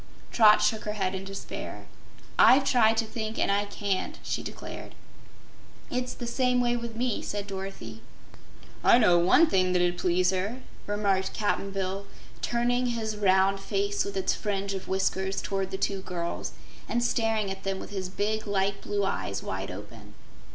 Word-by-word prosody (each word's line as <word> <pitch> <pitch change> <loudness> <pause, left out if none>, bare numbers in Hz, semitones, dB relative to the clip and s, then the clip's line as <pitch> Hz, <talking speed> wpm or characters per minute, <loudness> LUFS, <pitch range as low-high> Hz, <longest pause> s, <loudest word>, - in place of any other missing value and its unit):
Trot 210 -2 +6
shook 215 0 +1
her 210 - -2
head 190 -3 -1
in 190 0 -5
despair. 195 0 -7 0.5
"I've 265 +2 +8
tried 225 -4 +4
to 225 - +2
think 220 0 -4
and - - +2
I 200 +1 +2
can't," 200 -2 -2
she - - -2
declared. - - -8 1.0
"It's 250 0 -2
the 240 - -5
same 250 +1 +1
way 240 -1 +2
with 235 -1 -5
me," 245 -1 -1
said 205 -1 -4
Dorothy. 190 - -7 0.8
"I - - +7
know 180 -8 +5
one 180 - +6
thing 185 - +2
that 180 - +3
'ud 175 0 -3
please 180 +1 +2
her," 200 +7 -2 0.3
remarked 200 -2 0
Cap'n 205 -1 0
Bill, 195 0 -3 0.3
turning 245 +1 +1
his 225 -3 -2
round 195 -1 +3
face 200 +1 0
with 200 -1 -5
its 190 0 +1
fringe 200 -1 -2
of 190 -1 -5
whiskers 190 0 0
toward 195 -1 -2
the 190 - -4
two 195 0 -1
girls 170 -2 -4 0.4
and 240 0 +1
staring 225 -4 +1
at 190 0 -6
them 195 0 -2
with - - -8
his 190 -2 -3
big, 215 +3 -2
light 195 0 0
blue 205 -1 -1
eyes 100 - -2
wide 95 +1 -4
open. 105 +2 -10
200 Hz, 170 wpm, -28 LUFS, 190-220 Hz, 1.0 s, I've